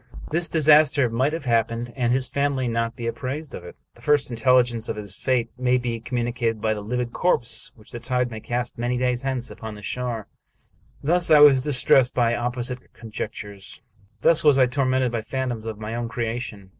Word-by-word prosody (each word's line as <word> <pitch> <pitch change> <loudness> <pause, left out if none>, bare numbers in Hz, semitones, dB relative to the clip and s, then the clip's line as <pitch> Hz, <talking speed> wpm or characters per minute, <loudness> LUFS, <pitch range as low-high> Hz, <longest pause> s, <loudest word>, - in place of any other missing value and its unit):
This 170 +2 0
disaster 150 -5 +5
might 130 +5 +1
have 160 -3 -5
happened, 115 0 0
and 120 -3 0
his 130 +1 +1
family 140 -2 -1
not 115 0 -1
be 120 - -6
apprised 135 +5 -4
of - - -7
it. 90 - -11 0.2
The - - -20
first 145 -3 +2
intelligence 120 -1 +2
of - - -2
his 100 -3 -4
fate 120 -2 0
may 125 0 +2
be 120 -2 -3
communicated 120 -1 -2
by 110 0 0
the 105 - -5
livid 120 +3 -3
corpse 145 -9 0
which 110 - -15
the 120 - -6
tide 125 0 -1
may 110 - -6
cast, 120 +1 -4
many 120 +1 -1
days 125 -1 0
hence, 130 -2 -2
upon 110 -1 -8
the 105 - -12
shore. 120 -1 -3 0.8
Thus 175 +4 +2
was 145 -3 +7
I 150 - -2
distressed 130 -1 +3
by 120 -2 +2
opposite 125 +1 -3
conjectures; 105 -3 -7 0.4
thus 165 -1 +4
was 145 -3 +5
I 130 - +6
tormented 130 -1 0
by 115 -2 -2
phantoms 120 -2 -4
of 110 -2 -5
my 105 +1 -6
own 120 0 -3
creation. 115 -4 -4
125 Hz, 195 wpm, -23 LUFS, 115-130 Hz, 0.8 s, was